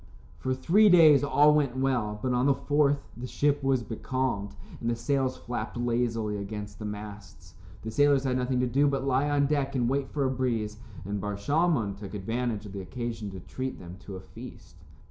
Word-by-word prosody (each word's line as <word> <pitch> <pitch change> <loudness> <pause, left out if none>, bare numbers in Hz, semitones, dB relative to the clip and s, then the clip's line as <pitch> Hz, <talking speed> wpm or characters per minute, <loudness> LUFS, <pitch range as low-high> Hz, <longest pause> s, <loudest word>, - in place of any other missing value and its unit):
For 130 0 -1
three 195 +11 +4
days 155 -6 +7
all 145 +1 +5
went 140 -4 +1
well, 125 -6 0
but 130 -1 +1
on 125 +2 +2
the 140 - +4
fourth 145 -1 +1
the 120 +3 -6
ship 145 +2 +1
was 135 -3 +1
becalmed 115 -2 -3 0.2
and 115 - -2
the 120 - +1
sails 135 +1 0
flapped 120 0 -5
lazily 115 -3 -1
against 105 0 -6
the 105 - -5
masts. 100 -4 -9 0.3
The 110 - -4
sailors 145 +1 +3
had 130 -2 0
nothing 125 0 0
to - - +2
do 140 +4 +3
but 135 -1 -1
lie 135 +2 +2
on 145 -1 +2
deck 140 -1 0
and 120 -2 +1
wait 135 +1 -1
for 140 -2 -1
a 130 - +1
breeze, 115 -5 -1 0.3
and 100 0 -3
Bar 105 0 -3
Shalmon 140 - +1
took 100 0 -8
advantage 115 +2 -2
of 100 - -9
the 100 - -5
occasion 115 +2 -5
to 95 -2 -8
treat 130 +8 -5
them 90 +1 -10
to 95 0 -9
a 95 - -7
feast. - - -12
125 Hz, 205 wpm, -28 LUFS, 105-140 Hz, 0.3 s, days